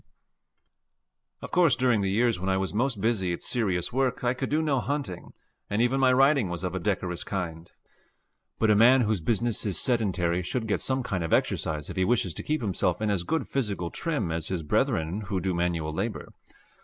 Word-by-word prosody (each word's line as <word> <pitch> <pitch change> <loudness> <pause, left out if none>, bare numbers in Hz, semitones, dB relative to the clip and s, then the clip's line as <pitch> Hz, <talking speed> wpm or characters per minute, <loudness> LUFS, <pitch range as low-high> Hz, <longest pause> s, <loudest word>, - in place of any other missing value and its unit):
Of - - -7
course 170 -6 +4
during 125 -4 +2
the 95 - 0
years 115 0 +1
when 95 +2 -2
I 95 - +2
was 95 -1 -2
most 120 0 0
busy 95 -5 0
at - - -6
serious 100 -4 -1
work 130 -1 0
I 120 0 +2
could 130 +1 -4
do 155 +2 +1
no 145 -4 +1
hunting, 135 -9 -4 0.4
and 105 - -1
even 125 +3 +2
my 130 -1 +4
riding 135 -4 +4
was 85 0 -4
of 90 -1 -2
a 95 - -2
decorous 90 -2 -2
kind. 85 -4 -5 0.9
But 110 -1 +3
a - - +5
man 125 +5 +6
whose 110 -5 0
business 115 +5 0
is 100 -4 -1
sedentary 95 -8 +1
should 110 +7 -3
get 105 - -1
some 130 -1 -1
kind 95 -7 -2
of 80 - -2
exercise 75 -2 0
if - - -9
he 95 - +2
wishes 95 -4 +1
to - - -5
keep 155 -1 -2
himself 95 -3 0
in 110 -1 0
as 95 -4 0
good 160 - -1
physical 100 -10 -2
trim 150 - -2
as 80 -1 -2
his 90 -4 -3
brethren 80 +5 0
who 95 -1 -1
do 95 0 -1
manual 85 -3 -1
labor. 105 +7 -3
105 Hz, 205 wpm, -27 LUFS, 90-125 Hz, 0.9 s, man